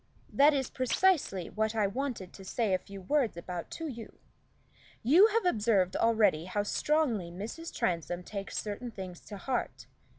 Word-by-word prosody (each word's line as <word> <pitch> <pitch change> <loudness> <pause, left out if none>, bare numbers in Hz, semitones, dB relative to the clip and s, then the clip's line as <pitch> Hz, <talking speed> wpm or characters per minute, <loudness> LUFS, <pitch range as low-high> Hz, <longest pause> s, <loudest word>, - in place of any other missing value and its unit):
"That 290 +2 +6
is 265 -3 -1
precisely 255 - +1
what 220 +1 -1
I 215 -2 +2
wanted 215 -3 -3
to 195 - -11
say 210 +1 0
a 185 - +2
few 195 +1 -10
words 255 - +1
about 170 0 -6
to 325 - -4
you. 235 -6 -8 0.9
You 330 - +7
have 450 -1 0
observed 210 - +2
already 210 -8 +3
how 205 +3 -1
strongly 240 - +1
Mrs. 220 - -6
Transome 175 0 -1
takes 195 +1 -6
certain 215 +4 -4
things 185 -5 -8
to 205 - -8
heart. 250 +5 -3
215 Hz, 160 wpm, -30 LUFS, 190-270 Hz, 0.9 s, You